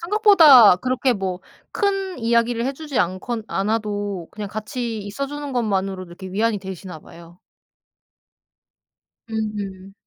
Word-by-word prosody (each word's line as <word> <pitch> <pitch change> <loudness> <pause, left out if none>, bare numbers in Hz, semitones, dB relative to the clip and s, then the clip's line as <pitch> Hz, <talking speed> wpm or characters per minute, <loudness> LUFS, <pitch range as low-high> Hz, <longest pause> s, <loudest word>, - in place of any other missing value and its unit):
생각보다 335 - +7
그렇게 255 +3 0
뭐 190 -3 -3 0.3
큰 390 -4 -1
이야기를 235 +1 +1
해 275 - -1
주지 295 -2 -5
않건 200 +6 -2
않아도 205 -3 -2
그냥 210 -1 -6
같이 220 +2 -4
있어 210 +7 -5
주는 290 -1 -6
것만으로도 195 -5 -1
이렇게 185 +2 -10
위안이 210 +3 0
되시나 190 -3 -8
봐요. 170 +2 -15 1.9
음. 205 -3 -5
215 Hz, 275 characters per minute, -22 LUFS, 195-255 Hz, 1.9 s, 생각보다